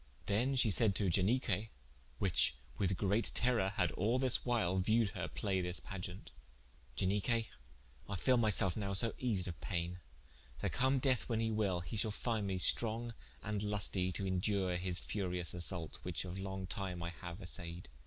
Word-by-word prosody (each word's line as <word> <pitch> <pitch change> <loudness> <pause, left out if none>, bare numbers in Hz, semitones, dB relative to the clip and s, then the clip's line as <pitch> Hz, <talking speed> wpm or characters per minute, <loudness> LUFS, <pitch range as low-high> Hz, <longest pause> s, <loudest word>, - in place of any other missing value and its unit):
Then 120 +7 +1
shee 120 -4 +4
sayed 100 0 +4
to 95 -3 +1
Ianique 105 +2 +1 0.5
(whiche 85 -9 +3 0.2
with 95 -2 +1
great 105 +4 +1
terrour, 120 -6 +3
had 100 - 0
all 110 +6 +1
this 130 -1 +4
whyle 105 -7 +1
viewed 110 +3 +2
her 95 -3 -4
play 95 -3 -1
this 90 0 -2
pageant) 95 0 -7 0.7
"Ianique 105 +5 +1 0.6
I 100 - -2
feele 125 +7 +3
my 110 -2 +3
selfe 95 -3 +3
now 100 -2 -2
so 115 +3 +5
eased 105 -8 0
of 85 -3 -7
payne 90 -2 -3 0.6
that - - -1
come 130 +2 +2
death 130 -2 +1
when 115 -2 0
he 115 0 0
will, 100 -5 0
he 85 +6 -5
shal 110 +1 +3
find 110 -1 -2
me 95 -1 -1
strong 115 +5 +4 0.3
and 105 -1 -2
lustie 100 -3 -1
to 100 - -3
indure 95 0 0
his 90 0 -2
furious 90 -4 -2
assault, 85 -2 -3
which - - -3
of 90 +1 -6
long 95 -1 -4
time 90 -2 -4
I 85 - -3
haue 85 0 -8
assaied. 85 -3 -4
100 Hz, 175 wpm, -35 LUFS, 90-110 Hz, 0.7 s, so